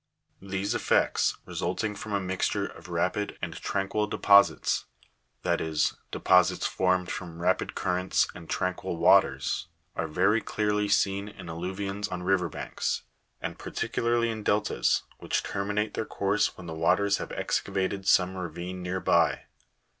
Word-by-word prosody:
These 95 +1 -2
effects, - - +2
resulting 95 +5 -2
from 105 +1 -7
a 100 - +1
mixture 95 -1 -1
of - - -10
rapid 105 0 -1
and - - -4
tranquil 100 +2 -1
deposits 100 -1 +4 0.6
(that - - +1
is, 80 -1 +1 0.2
deposits 90 -1 +3
formed 90 -1 +1
from 85 -4 -6
rapid 90 +2 0
currents 90 0 +1
and 85 -2 -11
tranquil 90 -1 -2
waters), 90 +3 +3 0.3
are - - -1
very 95 +8 +2
clearly 105 -1 0
seen 100 0 +1
in 95 -3 -11
alluvions 95 +4 -4
on 90 0 -4
river 90 -2 +2
banks, - - -3 0.4
and - - -4
par - - -7
ticularly 115 0 +1
in 110 -1 -5
deltas, 105 0 +1 0.2
which - - -1
terminate 105 +2 -2
their - - -1
course 100 +1 0
when 90 - -9
the 80 - -5
waters 95 +5 +2
have - - -6
excavated 95 0 -1
some 95 0 +4
ravine 90 +1 -5
near 90 +1 -2
by. 85 -2 +2
95 Hz, 145 wpm, -28 LUFS, 90-100 Hz, 0.6 s, deposits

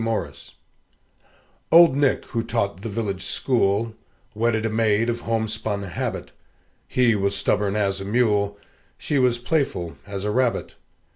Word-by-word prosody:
MORRIS 115 -1 -4 1.2
Old 170 -4 +8
Nick, 140 -1 +1
who 115 - -2
taught 100 -5 -2
the 115 - -5
village 100 -3 -3
school, 115 -3 +1 0.4
Wedded 110 0 0
a - - +1
maid 110 +1 +2
of 120 - -4
homespun 110 -3 -2
habit; 90 -3 -4 0.6
He 125 -2 +3
was 100 -1 0
stubborn 100 0 0
as 100 -2 0
a - - -5
mule, 105 -2 +1 0.4
She 145 - -1
was 125 -2 +3
playful 125 - -1
as 100 -1 -5
a 105 - 0
rabbit. 125 +1 0
110 Hz, 140 wpm, -23 LUFS, 100-120 Hz, 1.2 s, Old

